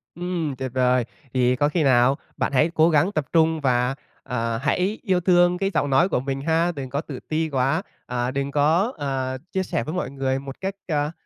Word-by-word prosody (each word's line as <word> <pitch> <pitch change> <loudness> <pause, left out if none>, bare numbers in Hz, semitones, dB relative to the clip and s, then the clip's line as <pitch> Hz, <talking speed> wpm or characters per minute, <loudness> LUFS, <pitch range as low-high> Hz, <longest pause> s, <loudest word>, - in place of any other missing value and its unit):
Ừm, 175 -5 -3
tuyệt 130 -1 -5
vời! 125 -1 +2 0.3
Thì 125 0 +3
có 145 +3 +2
khi 165 -1 0
nào 130 0 +4 0.2
bạn - - 0
hãy 150 +5 +4
cố 160 +1 +5
gắng 165 +5 +3
tập 155 -8 -1
trung 160 -1 +3
và, 125 0 +1 0.3
à, 115 -2 -2
hãy 185 +9 0
yêu 185 -6 +2
thương 175 0 +4
cái 195 +1 -1
giọng 145 - +1
nói 140 +8 +4
của - - +1
mình 135 +1 -3
ha, 165 +3 +1
đừng 140 -5 -6
có 140 +3 -2
tự 140 -5 -8
ti 160 0 0
quá, 135 +5 +1 0.3
à, 125 +1 -1
đừng 140 +1 -2
có, 160 - +2
à, 130 -2 -2
chia 190 - 0
sẻ 115 - -2
với 155 - -5
mọi 180 -7 -3
người 135 -1 -1
một 135 0 -8
cách, 195 +1 -3
à, 150 -1 0
145 Hz, 220 wpm, -23 LUFS, 130-170 Hz, 0.3 s, cố